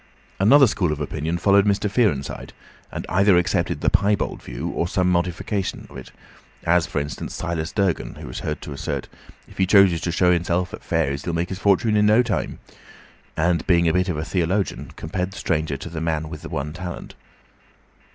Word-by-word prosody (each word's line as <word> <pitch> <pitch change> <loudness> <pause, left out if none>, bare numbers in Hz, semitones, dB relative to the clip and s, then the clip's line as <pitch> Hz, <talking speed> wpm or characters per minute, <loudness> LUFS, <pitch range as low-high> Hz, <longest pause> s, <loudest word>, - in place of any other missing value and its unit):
Another 135 +9 +7
school 95 -8 0
of 75 - -3
opinion 80 +3 -2
followed 100 +2 +4
Mr. 100 +1 +1
Fearenside, 100 - -1 0.4
and - - -5
either 95 0 +4
accepted 90 - 0
the - - +3
piebald 100 0 +1
view - - -5
or 85 - -1
some 90 0 0
modification 90 +3 -2
of - - -13
it; - - -9 0.5
as, 85 -1 +3
for - - -2
instance, 70 -1 -5
Silas 85 -1 -3
Durgan, 100 -5 -1
who - - -9
was 60 - -6
heard - - -4
to 75 - -7
assert 70 - -3
that - - -18 0.4
"if - - -15
he 95 - +3
chooses 95 -4 +5
to 85 - -1
show 90 +1 +3
enself 90 +1 0
at - - -8
fairs 70 0 -1
he'd 85 - -2
make 85 +1 -1
his 95 - -5
fortune 100 +2 +3
in 105 0 +4
no 110 +4 +5
time," 95 - -2 0.8
and 85 0 +1
being 85 -2 +4
a 80 - +2
bit 90 0 +1
of 85 - -1
a 75 - -3
theologian, 95 +3 -1
compared 90 +4 -4
the - - -10
stranger 80 -6 -1
to - - -8
the 80 -1 -5
man 80 -1 -1
with 80 -2 -8
the 80 - -8
one 75 -2 -4
talent. 90 0 -7
90 Hz, 200 wpm, -22 LUFS, 80-100 Hz, 0.8 s, Another